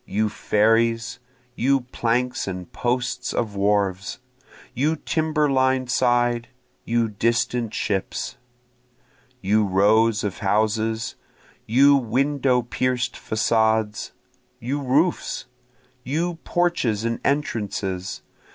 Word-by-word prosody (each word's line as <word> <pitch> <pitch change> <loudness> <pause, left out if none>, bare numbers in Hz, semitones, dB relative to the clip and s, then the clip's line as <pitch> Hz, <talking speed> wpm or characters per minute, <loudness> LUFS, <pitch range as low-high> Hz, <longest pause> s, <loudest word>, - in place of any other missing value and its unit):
You 105 +2 0
ferries! 115 +3 +1 0.3
you 135 +2 +2
planks 125 +1 0
and 90 -2 -6
posts 125 0 -1
of 110 -4 -2
wharves! 100 -1 0 0.6
you 145 +6 +1
timber 155 -1 0
lined 130 -2 +1
side! 120 -1 +2 0.4
you 115 0 +1
distant 115 +2 0
ships! 95 -2 -2 1.1
You 105 +3 +2
rows 105 +3 +3
of 100 -3 -3
houses! 110 +2 0 0.5
you 140 +5 +6
window 130 +1 +1
pierc'd 125 +1 -1
facades! 110 -1 0 0.5
you 135 +5 -3
roofs! 145 +7 0 0.6
You 165 +6 -2
porches 170 -12 0
and 115 0 -1
entrances! 100 -9 -2
115 Hz, 95 wpm, -23 LUFS, 105-130 Hz, 1.1 s, you